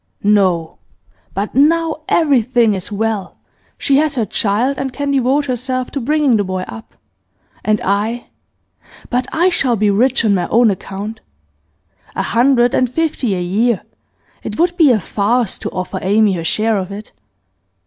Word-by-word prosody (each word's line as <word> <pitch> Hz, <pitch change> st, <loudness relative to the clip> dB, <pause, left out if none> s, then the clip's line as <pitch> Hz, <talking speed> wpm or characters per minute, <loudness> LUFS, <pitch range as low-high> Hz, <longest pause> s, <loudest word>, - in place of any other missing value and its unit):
'No! 190 Hz, -6 st, +1 dB, 0.6 s
But 200 Hz, +2 st, -3 dB
now 320 Hz, +4 st, +2 dB
everything 250 Hz, -7 st, +3 dB
is 190 Hz, 0 st, -5 dB
well. 210 Hz, -1 st, -2 dB, 0.4 s
She 275 Hz, -, +2 dB
has 300 Hz, 0 st, +1 dB
her 235 Hz, -4 st, 0 dB
child, 225 Hz, +7 st, 0 dB
and 270 Hz, -1 st, -3 dB
can 285 Hz, +2 st, -3 dB
devote 275 Hz, +2 st, +1 dB
herself 255 Hz, 0 st, -3 dB
to 280 Hz, -, -3 dB
bringing 285 Hz, -2 st, +2 dB
the 205 Hz, -, +1 dB
boy 185 Hz, -1 st, -3 dB
up. 225 Hz, -, -11 dB, 0.7 s
And 215 Hz, -1 st, +1 dB
I 210 Hz, +5 st, -1 dB, 0.8 s
but 250 Hz, +1 st, 0 dB
I 345 Hz, +3 st, +2 dB
shall 260 Hz, -8 st, +1 dB
be 210 Hz, -1 st, +2 dB
rich 245 Hz, +4 st, +2 dB
on 210 Hz, -, +3 dB
my 180 Hz, -3 st, 0 dB
own 230 Hz, -1 st, +4 dB
account. 200 Hz, +3 st, -6 dB, 0.9 s
A -, -, -1 dB
hundred 245 Hz, 0 st, +2 dB
and 255 Hz, -, +2 dB
fifty 265 Hz, -7 st, -1 dB
a 180 Hz, -, -3 dB
year; 210 Hz, +5 st, 0 dB, 0.6 s
it -, -, -6 dB
would 345 Hz, +1 st, +1 dB
be 325 Hz, -5 st, +5 dB
a 235 Hz, -4 st, +3 dB
farce 210 Hz, +4 st, 0 dB
to -, -, -4 dB
offer 185 Hz, +1 st, -4 dB
Amy 205 Hz, +1 st, +3 dB
her 170 Hz, -2 st, -3 dB
share 215 Hz, +5 st, +1 dB
of 185 Hz, +1 st, -5 dB
it. 205 Hz, +2 st, -9 dB
230 Hz, 160 wpm, -17 LUFS, 200-270 Hz, 0.9 s, be